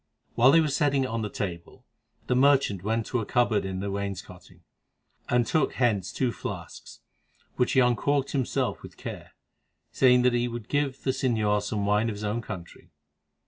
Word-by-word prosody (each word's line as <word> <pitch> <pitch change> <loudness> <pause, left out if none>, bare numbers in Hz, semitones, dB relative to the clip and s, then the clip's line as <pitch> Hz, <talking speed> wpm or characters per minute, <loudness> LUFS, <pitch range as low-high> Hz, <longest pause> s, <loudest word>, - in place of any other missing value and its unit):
While 125 +3 +5
they 165 +4 +6
were 155 - +1
setting 140 -1 +1
it - - -1
on 115 -2 -3
the 105 - -3
table, 85 -4 -6 0.4
the 125 - 0
merchant 135 -7 +3
went 110 +3 -1
to 125 - -1
a 110 - -3
cupboard 120 -5 +1
in 95 -1 -4
the 100 0 -3
wainscoting, 100 -2 -7 0.7
and 120 -1 +3
took 155 +1 0
thence 105 -7 +1
two 125 -2 0
flasks, - - -8 0.5
which 125 - +1
he 130 - +5
uncorked 135 +3 +1
himself 130 -4 -1
with - - -12
care, - - -8 0.6
saying 125 -1 +4
that 125 -1 +3
he 120 0 +1
would 120 -2 -7
give 145 -2 -1
the 130 - +1
señor 110 -6 +1
some 105 0 -2
wine 105 +3 +2
of 105 - -4
his 105 - -8
own 105 +3 -1
country. 95 -6 -9
120 Hz, 185 wpm, -27 LUFS, 105-130 Hz, 0.7 s, they